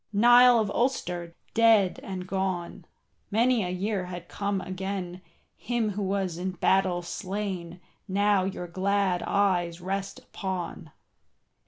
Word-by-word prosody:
Niall 240 +3 +7
of 210 -2 0
Ulster, 175 -10 -1 0.2
dead 225 -5 +4
and 185 -2 -6
gone, 185 -2 -3 0.4
Many 235 +1 +3
a 180 - -3
year 190 +1 -2
had 175 -1 -8
come 200 -1 -2
again, 185 -1 -5 0.3
Him 235 -3 -1
who 205 +1 -4
was 190 -3 -1
in 185 +1 -2
battle 185 0 +2
slain 185 -2 -4 0.3
Now 200 0 +2
your 190 -1 -4
glad 190 +1 0
eyes 180 -4 +1
rest 195 +2 -3
upon. 180 -4 -5
190 Hz, 125 wpm, -27 LUFS, 180-205 Hz, 0.4 s, Niall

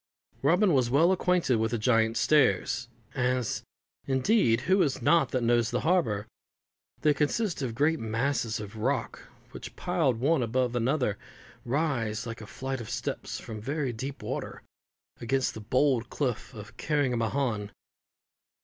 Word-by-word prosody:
Robin 175 +6 +4
was 130 -4 +2
well 160 +8 +4
acquainted 180 -8 +2
with 110 +1 +1
the 120 - -1
Giant's 115 0 +2
Stairs 140 -5 +2 0.3
as, 125 -3 0 0.5
indeed, 130 - +3
who 190 +6 +3
is 140 -5 +1
not 165 +7 +3
that 130 -3 -1
knows 120 -1 +3
the 125 - -1
harbour? 155 - +1 0.8
They 150 - +4
consist 160 +6 0
of 120 -4 -3
great 160 +5 +2
masses 115 +1 -1
of 105 +1 -8
rock, 125 +2 -1 0.3
which, - - -9
piled 125 -4 0
one 145 +3 +2
above 125 +1 0
another, 120 -3 0 0.4
rise 120 -5 -1
like 115 -1 -6
a 105 - -9
flight 130 +2 -4
of 110 - -8
steps 125 +2 -4
from 110 -3 -8
very 135 +1 -2
deep 135 +5 -6
water, - - -5 0.6
against 130 +2 0
the 110 - -8
bold 125 +1 +1
cliff 125 -6 -2
of 110 +1 -10
Carrigmahon. 125 -6 0
125 Hz, 145 wpm, -28 LUFS, 115-145 Hz, 0.8 s, Robin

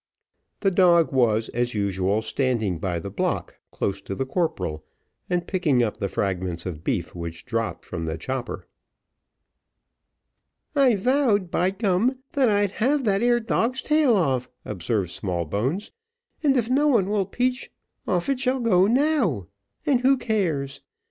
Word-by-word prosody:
The 195 - +3
dog 175 -3 +4
was, 115 -4 +2
as 120 0 -1
usual, 100 +1 0
standing 110 - -1
by 90 -1 -2
the 100 +4 -6
block 100 - -2
close 100 0 -3
to 100 - -5
the 135 - -2
corporal, 95 - -2 0.5
and 175 -1 0
picking 155 -11 +2
up 110 - -2
the 100 - -2
fragments 90 -4 -2
of 80 -4 -6
beef - - -2
which 85 -1 -7
dropped 115 -3 -3
from 85 -2 -5
the 80 0 -3
chopper. 130 +7 -4 2.1
"I 270 -5 +5
vowed 210 -4 +2
by 180 +2 +2
gum, 200 +5 +1
that 265 -4 +3
I'd 205 -2 +2
have 270 +7 +1
that 200 -3 +2
ere 240 0 +3
dog's 235 +2 0
tail 300 -6 +3
off," 130 -8 0 0.2
observed 95 -1 -2
Smallbones; 100 - -2 0.5
"and 275 -3 +3
if 230 -3 +1
no 275 +4 +3
one 230 -10 +3
will 200 -2 0
peach, 250 +1 -1 0.4
off 180 -4 0
it 275 -2 0
shall 260 0 +1
go 195 -6 +4
now. 245 - +2 0.4
And 260 -4 +3
who 265 +1 +4
cares? 160 - -1
175 Hz, 150 wpm, -24 LUFS, -, 2.1 s, I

